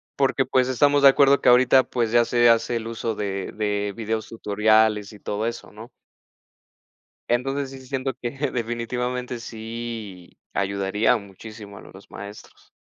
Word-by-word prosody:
porque, 135 -1 +1
pues, 130 0 +2
estamos 145 +3 +3
de - - +10
acuerdo 140 0 +4
que - - -2
ahorita 130 +1 +6
pues 120 -3 -2
ya 120 0 +4
se 120 0 +4
hace 115 +1 +2
el 115 0 -6
uso 115 0 -3
de 100 -2 -4
de 105 -1 -2
videos 110 -1 -3
tutoriales 110 -1 +1
y 105 - -13
todo 105 +2 -3
eso, 115 +1 -5
¿no? 110 +3 -12 1.4
Entonces 135 +3 -1
sí, 135 -1 -11
siento 135 0 -3
que 120 - -5 0.2
definitivamente 125 +1 -3
sí 115 -5 -8
ayudaría 100 +4 +1
muchísimo 100 0 -11
a - - -12
los 95 +1 -15
maestros. 100 +1 -11
115 Hz, 150 wpm, -23 LUFS, 105-125 Hz, 1.4 s, de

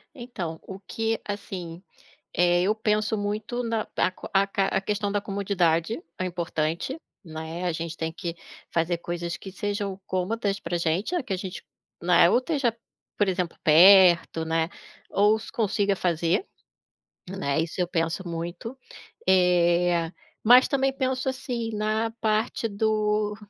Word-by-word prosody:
Então, 190 - -6
o 190 0 -9
que, 225 +3 -2
assim, 185 -4 -6 0.5
eh, 175 +1 +4
eu 210 +3 +2
penso 215 0 0
muito 215 +4 -3
na 225 -2 -1
aca 185 - -1
aca 195 0 +2
a - - 0
questão 205 0 -1
da 205 - +1
comodidade 195 -2 0 0.2
é 185 - -1
importante, 170 - -2 0.2
né. 160 +2 -6
A 175 - +1
gente 165 0 -5
tem 160 0 -2
que 170 0 -5 0.4
fazer 170 +1 0
coisas 170 0 -4
que 190 - -9
sejam 200 -1 -3
cômodas 200 +2 -1
pra 175 -1 -2
gente, 185 - 0
que 200 - -3
a - - -1
gente, 185 -1 -6 0.4
né, 175 0 +5
ou - - +4
esteja, 255 -4 0 0.4
por 205 - +2
exemplo 180 -2 -2
perto, 170 0 +6
né, 165 +1 0 0.4
ou 210 +2 +4
se - - -10
consiga 205 -2 +1
fazer, 170 - 0 0.8
né, 160 -7 -1
isso 170 +2 -5
eu 175 - +1
penso 170 +1 -1
muito. 170 +9 -5 0.5
Eh, 175 -2 +3 0.3
mas 245 +3 +7
também 270 -2 +1
penso, 260 -1 -1
assim, 240 -3 -3
na 215 +2 0
parte 220 +1 0
do, 210 0 0
195 Hz, 145 wpm, -26 LUFS, 170-215 Hz, 0.8 s, mas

